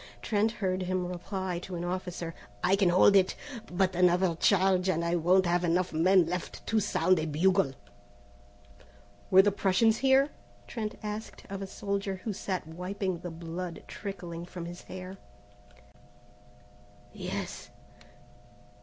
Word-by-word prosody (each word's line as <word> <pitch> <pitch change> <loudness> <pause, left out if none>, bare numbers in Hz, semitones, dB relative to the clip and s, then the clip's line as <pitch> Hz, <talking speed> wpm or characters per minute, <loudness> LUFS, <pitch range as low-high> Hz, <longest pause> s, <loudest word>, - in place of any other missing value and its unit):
Trent 220 0 +1
heard 190 -4 -1
him 185 0 -1
reply 180 0 -4
to 180 +1 -7
an 170 - -4
officer: 175 -2 -4 0.3
"I 190 - +4
can 195 -3 +3
hold 185 +3 +6
it, 190 -1 +4 0.4
but 185 0 +1
another 180 0 +3
charge, 185 +1 +3
and 170 -2 +1
I 170 +1 +1
won't 180 +3 +4
have 175 +1 +1
enough 175 0 +1
men 180 +3 +5
left 180 +2 -5
to 225 - +2
sound 185 -3 +2
a 155 - -2
bugle." 165 -1 +2 1.6
"Were 190 +1 +8
the 205 - +3
Prussians 205 +3 +3
here?" 270 +1 +4 0.4
Trent 220 -3 -4
asked 210 +1 -6
of 195 0 -4
a 195 - -4
soldier 200 0 -3
who 215 - -2
sat 185 -2 -3
wiping 180 +2 -3
the 175 - -6
blood 165 +1 -6
trickling 175 -4 -6
from 175 -1 -7
his 175 +1 -8
hair. 185 +1 -8 2.0
"Yes. - - -5
185 Hz, 140 wpm, -29 LUFS, 175-195 Hz, 2.0 s, Were